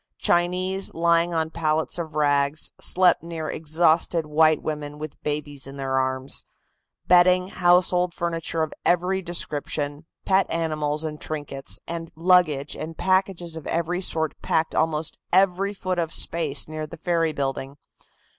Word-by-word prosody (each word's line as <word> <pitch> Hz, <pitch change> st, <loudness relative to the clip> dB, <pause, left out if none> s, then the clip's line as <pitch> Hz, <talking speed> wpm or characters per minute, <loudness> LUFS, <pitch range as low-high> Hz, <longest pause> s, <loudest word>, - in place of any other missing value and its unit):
Chinese, 185 Hz, +2 st, +1 dB
lying 170 Hz, +1 st, +2 dB
on 160 Hz, -1 st, -1 dB
pallets 160 Hz, 0 st, -1 dB
of 160 Hz, -2 st, -6 dB
rags, 145 Hz, 0 st, +1 dB
slept 180 Hz, -1 st, +3 dB
near 165 Hz, -2 st, -5 dB
exhausted 160 Hz, +1 st, +1 dB
white 155 Hz, +1 st, +3 dB
women 150 Hz, -1 st, -5 dB
with 155 Hz, 0 st, -8 dB
babies 145 Hz, -2 st, -2 dB
in 135 Hz, +1 st, -9 dB
their 135 Hz, -1 st, -2 dB
arms. 130 Hz, 0 st, -1 dB, 0.6 s
Bedding, 180 Hz, +1 st, +5 dB
household 180 Hz, -1 st, +3 dB
furniture 165 Hz, -1 st, -2 dB
of 155 Hz, -, -4 dB
every 180 Hz, +2 st, +1 dB
description, 150 Hz, -3 st, -2 dB, 0.2 s
pet 195 Hz, 0 st, +3 dB
animals 155 Hz, -2 st, -1 dB
and 155 Hz, -1 st, -5 dB
trinkets, 145 Hz, -3 st, -4 dB, 0.4 s
luggage 165 Hz, -4 st, +2 dB
and 160 Hz, 0 st, -7 dB
packages 185 Hz, -3 st, 0 dB
of 160 Hz, -, -8 dB
every 170 Hz, +2 st, -1 dB
sort 160 Hz, -4 st, +1 dB
packed 160 Hz, 0 st, 0 dB
almost 160 Hz, -1 st, 0 dB
every 195 Hz, +1 st, +3 dB
foot 185 Hz, -3 st, -3 dB
of 165 Hz, -2 st, -2 dB
space 155 Hz, -7 st, +2 dB
near 155 Hz, 0 st, -5 dB
the 170 Hz, -, -10 dB
ferry 165 Hz, -1 st, 0 dB
building. 135 Hz, -1 st, -3 dB
160 Hz, 135 wpm, -24 LUFS, 150-175 Hz, 0.6 s, Bedding